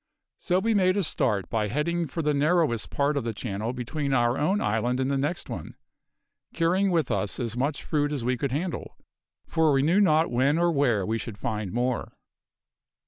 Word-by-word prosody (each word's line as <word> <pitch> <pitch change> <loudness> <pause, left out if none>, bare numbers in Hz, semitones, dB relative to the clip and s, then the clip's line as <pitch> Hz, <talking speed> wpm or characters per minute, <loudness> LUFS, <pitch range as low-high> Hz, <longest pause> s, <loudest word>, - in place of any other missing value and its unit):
So 180 -1 +1
we 225 +4 +1
made 185 -1 +3
a 200 - +2
start 105 - 0
by 110 -2 -1
heading 165 - -1
for 165 +4 -4
the 150 0 +2
narrowest 145 -5 +1
part 145 +1 0
of 140 - -1
the 115 -2 -3
channel 110 +1 -3
between 135 +3 -3
our 120 0 +2
own 185 +9 +1
island 120 - 0
and 130 +1 0
the - - +1
next 150 +6 -2
one, - - -7 0.8
carrying 180 +4 +2
with 165 -6 +1
us 100 - -1
as 115 -2 -2
much 140 +4 -1
fruit 145 -2 0
as 135 -6 -3
we 125 +1 +1
could 130 +2 -2
handle, 165 +5 -4 0.5
for 160 -1 +2
we 135 -1 +3
knew 175 +7 +3
not 160 -3 +3
when 135 +5 +2
or 170 0 +3
where 125 - +1
we 115 +3 -1
should 110 -3 -7
find 105 -2 -3
more. 125 +1 -2
140 Hz, 195 wpm, -26 LUFS, 120-165 Hz, 0.8 s, made